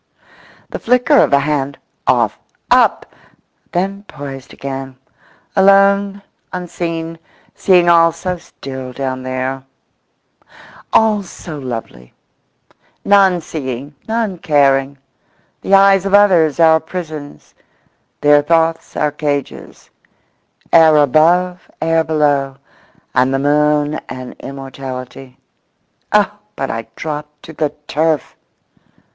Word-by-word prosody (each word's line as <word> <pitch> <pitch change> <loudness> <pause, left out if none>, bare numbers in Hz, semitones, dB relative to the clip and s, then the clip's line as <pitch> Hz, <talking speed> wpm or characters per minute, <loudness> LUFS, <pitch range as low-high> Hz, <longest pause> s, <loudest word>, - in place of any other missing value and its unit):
The - - -5
flicker 250 +5 +3
of - - +3
a 140 - +5
hand—off, 140 -1 -1 0.3
up! - - +2 0.6
then 195 +3 -2
poised 135 -2 -9
again. 135 -1 -7 0.6
Alone, 200 0 +4 0.3
unseen; 165 -2 -5 0.3
seeing 180 -2 +3
all 165 -1 +5
so 180 +2 -4
still 130 -5 -9
down 130 -1 -4
there, 130 +1 -3 1.3
all 215 -2 +3
so 170 -4 -9
lovely. 115 - -7 0.9
None 195 -3 +4
seeing, 140 -2 -6
none 220 -5 -2
caring. 140 -3 +2 0.6
The 195 - +3
eyes 195 -1 +5
of 195 - +3
others 175 -7 +4
our 160 -1 +6
prisons; 155 -4 -8 0.7
their 145 0 +5
thoughts 165 +1 0
our 150 -1 +1
cages. 145 -2 -5 0.8
Air 160 -2 +7
above, 170 +6 +2
air 165 0 +1
below. 145 -4 0 0.6
And 130 +1 +2
the 135 - +1
moon 150 +1 +1
and 130 -1 -7
immortality.… 135 -1 -8 0.7
Oh, - - +2 0.2
but - - -3
I 115 0 -5
drop 150 -1 -5
to 160 - -10
the 150 -1 -1 0.2
turf! 155 -1 -1
155 Hz, 105 wpm, -16 LUFS, 135-180 Hz, 1.3 s, Air